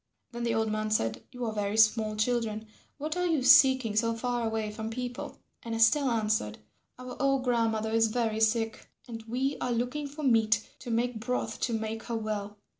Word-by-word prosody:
Then 240 Hz, -1 st, -6 dB
the 230 Hz, -1 st, 0 dB
old 220 Hz, -1 st, 0 dB
man 215 Hz, 0 st, -2 dB
said, 165 Hz, -, 0 dB
"You 250 Hz, -2 st, -5 dB
are 220 Hz, -, -2 dB
very 205 Hz, 0 st, -2 dB
small 215 Hz, -1 st, +3 dB
children; 220 Hz, -1 st, -1 dB, 0.3 s
what 305 Hz, +3 st, -3 dB
are 360 Hz, 0 st, 0 dB
you 315 Hz, -6 st, +1 dB
seeking 260 Hz, -4 st, +6 dB
so 230 Hz, +1 st, +1 dB
far 240 Hz, 0 st, -1 dB
away 220 Hz, -1 st, -2 dB
from 220 Hz, +1 st, -5 dB
people?" 245 Hz, +1 st, -5 dB, 0.2 s
And 230 Hz, -1 st, -4 dB
Estelle 255 Hz, +5 st, +4 dB
answered, 215 Hz, -, 0 dB, 0.4 s
"Our 255 Hz, 0 st, -8 dB
old 275 Hz, -1 st, +2 dB
grandmother 225 Hz, -3 st, 0 dB
is 225 Hz, 0 st, +3 dB
very 220 Hz, -1 st, -1 dB
sick, 225 Hz, 0 st, 0 dB, 0.2 s
and 225 Hz, -2 st, -7 dB
we 260 Hz, +4 st, -1 dB
are 250 Hz, -, -1 dB
looking 250 Hz, +5 st, -2 dB
for 290 Hz, +2 st, -8 dB
meat 225 Hz, -3 st, +3 dB
to -, -, -8 dB
make 235 Hz, 0 st, 0 dB
broth 250 Hz, +3 st, -3 dB
to 235 Hz, -, -1 dB
make 220 Hz, 0 st, -3 dB
her 235 Hz, -, -3 dB
well." 210 Hz, -1 st, -4 dB
225 Hz, 190 wpm, -29 LUFS, 220-250 Hz, 0.4 s, seeking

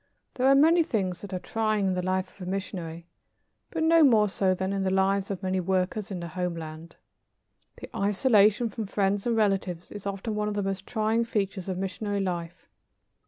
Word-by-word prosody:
There 255 Hz, +1 st, +1 dB
are 275 Hz, -, +7 dB
many 325 Hz, +5 st, +6 dB
things 195 Hz, -, -1 dB
that 205 Hz, -, -8 dB
are 185 Hz, -, -2 dB
trying 215 Hz, +1 st, -1 dB
in 190 Hz, -, +1 dB
the 180 Hz, -, -1 dB
life 185 Hz, +1 st, -1 dB
of 180 Hz, -, -5 dB
a -, -, -3 dB
missionary, 175 Hz, -4 st, -5 dB, 0.6 s
but 325 Hz, -1 st, -2 dB
no 330 Hz, 0 st, +6 dB
more 220 Hz, -7 st, +5 dB
so 190 Hz, -1 st, +1 dB
than 190 Hz, +1 st, -2 dB
in 195 Hz, -, -1 dB
the 190 Hz, -, +1 dB
lives 190 Hz, +1 st, +1 dB
of 195 Hz, -1 st, -4 dB
many 185 Hz, 0 st, 0 dB
workers 190 Hz, +3 st, -1 dB
in 190 Hz, -3 st, -4 dB
the 170 Hz, -, -5 dB
homeland. 165 Hz, -1 st, -5 dB, 0.8 s
The -, -, -11 dB
isolation 210 Hz, +2 st, +3 dB
from 220 Hz, -1 st, -5 dB
friends 200 Hz, +1 st, 0 dB
and 230 Hz, -1 st, +1 dB
relatives 195 Hz, -5 st, 0 dB
is 205 Hz, -1 st, -7 dB
often 200 Hz, +3 st, -3 dB
one 210 Hz, 0 st, -1 dB
of 210 Hz, -, -2 dB
the 205 Hz, -, -1 dB
most 195 Hz, 0 st, -3 dB
trying 220 Hz, +1 st, +1 dB
features 200 Hz, -4 st, -2 dB
of 185 Hz, -, -2 dB
missionary 200 Hz, +2 st, -3 dB
life. 175 Hz, -2 st, -4 dB
195 Hz, 200 wpm, -27 LUFS, 185-215 Hz, 0.8 s, are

